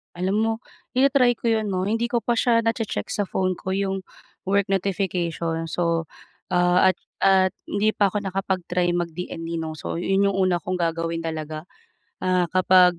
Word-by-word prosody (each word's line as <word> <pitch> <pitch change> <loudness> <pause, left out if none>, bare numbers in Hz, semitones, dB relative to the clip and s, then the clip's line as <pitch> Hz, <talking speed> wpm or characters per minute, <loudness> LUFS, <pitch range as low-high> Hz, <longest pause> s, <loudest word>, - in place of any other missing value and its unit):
Alam 185 +3 0
mo, 225 0 +2 0.4
ita-try 255 -2 +4
ko 230 0 0
'yon 220 -1 +1
'no. 185 -2 -1
Hindi 225 +4 0
ko 235 -1 -1
pa 240 -1 +1
siya 230 -1 +3
nache-check 225 -1 -2
sa 205 -2 -1
phone 185 -1 -1
ko, 190 - -3
yung 195 -1 -1 0.5
work 200 0 +2
notification. 175 -4 -1
So, 165 0 0 0.5
ah, 180 +1 +4
at - - -44 0.2
at 190 -1 +4 0.2
hindi 210 +2 +1
pa 205 -2 +2
ako 205 +2 -2
nakapag-try 180 -2 -1
mag-DND 170 -1 -4
'no, 160 -1 -4
so 155 - -5
'yon 195 +2 +2
yung 195 - -2
una 185 -2 +2
kong 185 +3 -2
gagawin 165 0 -1
talaga, 155 0 -4 0.6
ah, 180 -1 +2
kapag 185 -1 +5
185 Hz, 165 wpm, -24 LUFS, 175-200 Hz, 0.6 s, kapag